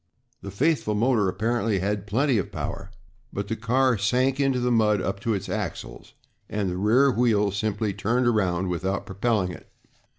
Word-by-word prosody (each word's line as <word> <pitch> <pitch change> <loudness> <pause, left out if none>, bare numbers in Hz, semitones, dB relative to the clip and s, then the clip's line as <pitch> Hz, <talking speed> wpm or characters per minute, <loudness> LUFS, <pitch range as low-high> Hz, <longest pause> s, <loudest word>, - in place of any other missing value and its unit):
The 100 - -7
faithful 120 0 0
motor 110 -3 +2
apparently 110 +2 0
had 100 +1 -2
plenty 125 +3 +2
of 95 - -4
power, - - -5 0.4
but 100 0 -4
the 115 - -1
car 125 +1 +1
sank 130 +6 +1
into 135 -2 +2
the 125 0 0
mud 105 -3 +3
up 95 +1 -3
to 110 +1 -1
its 100 0 -5
axles, - - -5 0.4
and 100 -3 -1
the 90 - -3
rear 120 +8 +4
wheels 105 -5 +2
simply 105 0 -1
turned 115 +6 0
around 95 -6 +1
without 95 +3 -2
propelling 100 -1 0
it. - - -12
105 Hz, 170 wpm, -25 LUFS, 100-120 Hz, 0.4 s, rear